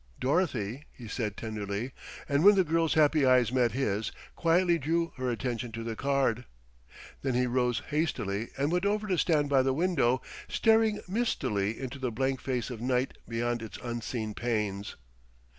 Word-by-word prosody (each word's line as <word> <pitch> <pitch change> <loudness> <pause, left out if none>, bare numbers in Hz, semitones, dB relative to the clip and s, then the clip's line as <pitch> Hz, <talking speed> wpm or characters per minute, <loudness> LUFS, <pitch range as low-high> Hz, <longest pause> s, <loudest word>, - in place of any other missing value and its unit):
"Dorothy," 135 - 0
he 120 - -11
said 105 -1 -3
tenderly; 110 +2 -4 0.4
and 140 +2 +2
when 205 +1 +8
the 190 - +4
girl's 165 -1 +1
happy 155 -1 +4
eyes 130 -2 +4
met 125 -3 +2
his, 110 -5 -1 0.2
quietly 170 +1 +3
drew 165 +3 0
her 130 -1 -1
attention 120 0 -3
to 115 +1 -5
the 115 -1 -4
card. 135 -3 0 0.8
Then 135 -3 -1
he 125 0 +3
rose 125 -1 0
hastily, 115 -9 -1
and 140 +3 +1
went 180 +3 +1
over 210 +1 0
to 190 -4 0
stand 150 -4 +2
by 140 -2 +4
the 130 0 +1
window, 140 -7 +2 0.2
staring 220 -1 +3
mistily 115 - -1
into 135 +1 -6
the 130 -1 -1
blank 130 +3 -1
face 125 -3 -2
of 115 -2 -7
night 125 +1 0
beyond 120 0 -1
its 110 -2 -7
unseen 120 -2 -3
panes. 105 -4 -2
130 Hz, 165 wpm, -29 LUFS, 115-155 Hz, 0.8 s, when